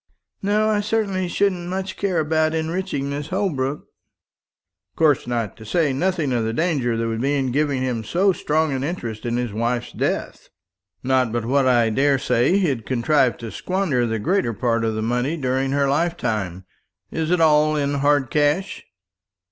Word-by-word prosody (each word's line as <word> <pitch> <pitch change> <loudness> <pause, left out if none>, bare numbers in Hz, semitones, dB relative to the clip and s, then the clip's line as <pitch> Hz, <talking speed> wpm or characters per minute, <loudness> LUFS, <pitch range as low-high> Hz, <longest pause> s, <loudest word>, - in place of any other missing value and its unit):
"No; 210 +2 +2
I 210 - +2
certainly 205 -3 -1
shouldn't 180 -1 0
much 190 +1 -3
care 190 -4 0
about 155 +1 +1
enriching 160 -3 -2
this 145 +1 -4
Holbrook." 150 -7 -1
"Of 90 0 -46
course 150 -6 +2
not; 115 -4 -2
to 110 - -11
say 145 +6 +1
nothing 165 -2 0
of 120 -2 +1
the 110 0 -2
danger 135 -6 0
there 115 0 -1
would 115 0 -2
be 140 +2 +1
in 135 -3 0
giving 140 -1 0
him 120 -3 -2
so 190 - +2
strong 155 -2 0
an 130 0 -2
interest 120 -9 -4
in 120 0 -1
his 120 -4 -2
wife's 120 +2 -1
death. - - -3 0.5
Not 130 -2 +2
but 120 -1 -2
what 135 +2 +2
I 120 -3 +3
daresay 135 - +2
he'll 145 -12 0
contrive 130 +2 +1
to 115 -2 -7
squander 180 -11 -1
the 115 0 -1
greater 165 - 0
part 115 +1 0
of 110 -1 0
the 110 - -2
money 125 +7 -1
during 130 -1 0
her 140 0 +1
lifetime. 120 - -1 0.5
Is 160 -1 -2
it 180 0 +2
all 155 -1 +4
in 145 -1 0
hard 145 -2 +2
cash?" 150 +5 0
140 Hz, 175 wpm, -22 LUFS, 120-165 Hz, 0.5 s, all